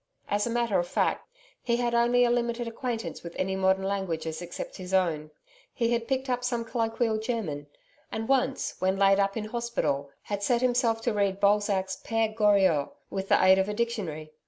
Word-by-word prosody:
As 205 +2 0
a - - -2
matter 235 -4 +1
of 175 - -1
fact, - - 0 0.3
he 235 -1 0
had 240 -1 0
only 240 +1 +4
a 240 - +2
limited 240 0 -1
acquaintance 230 - -4
with 170 -1 -9
any 190 +1 -1
modern 190 0 +2
languages 170 -5 -2
except 175 0 -7
his 185 0 -2
own. 160 -5 +1 0.5
He 235 -2 +1
had 235 -1 -1
picked 265 0 -1
up 250 -1 -1
some 240 -2 -1
colloquial 225 -1 0
German, 205 -11 -3 0.4
and 220 0 -3
once 270 0 +1
when 190 +1 +1
laid 195 0 +4
up 195 +2 +1
in 215 - -3
hospital, 215 - -2
had 205 -1 -4
set 235 +3 +2
himself 240 -2 +2
to 235 0 0
read 200 -2 0
Balzac's 200 -2 +2
PERE 225 -1 0
GORIOT 200 -9 +3 0.2
with 195 0 -4
the - - +5
aid 190 0 +7
of 190 +2 +1
a 210 - -3
dictionary. 195 -10 -3
210 Hz, 190 wpm, -28 LUFS, 190-235 Hz, 0.5 s, aid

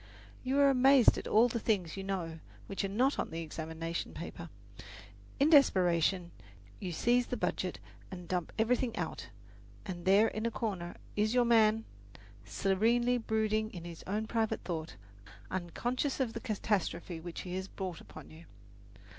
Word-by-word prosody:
You 260 +2 0
are 280 -1 +6
amazed 265 -1 +6
at - - -7
all 225 +3 +5
the 235 -1 -2
things 195 -7 0
you 195 - -5
know 175 -4 -3 0.3
which 195 - -3
are - - 0
not 255 +8 +1
on - - -1
the 165 +1 -4
examination 160 +1 -5
paper. 170 0 -7 0.9
In 290 +4 +4
desperation 180 - +4 0.5
you 185 - -4
seize 240 +8 +2
the - - -3
budget - - -2 0.3
and 180 -3 -8
dump 180 -2 -2
everything 230 +1 +1
out, 165 - -4 0.6
and 175 -2 -6
there 200 +4 +5
in 220 +1 -2
a - - +1
corner 195 -7 -4 0.2
is 215 +3 +1
your 245 -1 +4
man, 225 -1 +4 0.6
serenely 225 - +2
brooding 220 -1 0
on 170 - -7
his 170 -1 -9
own 210 +3 -1
private 220 -1 -1
thought, 165 -2 -4 0.6
unconscious 240 - -2
of 250 -4 0
the - - -4
catastrophe 190 -6 -2
which 170 +1 -7
he 180 - -6
has 190 +1 -3
brought 185 -3 -6
upon - - -12
you. 160 +2 -13
200 Hz, 160 wpm, -32 LUFS, 175-230 Hz, 0.9 s, are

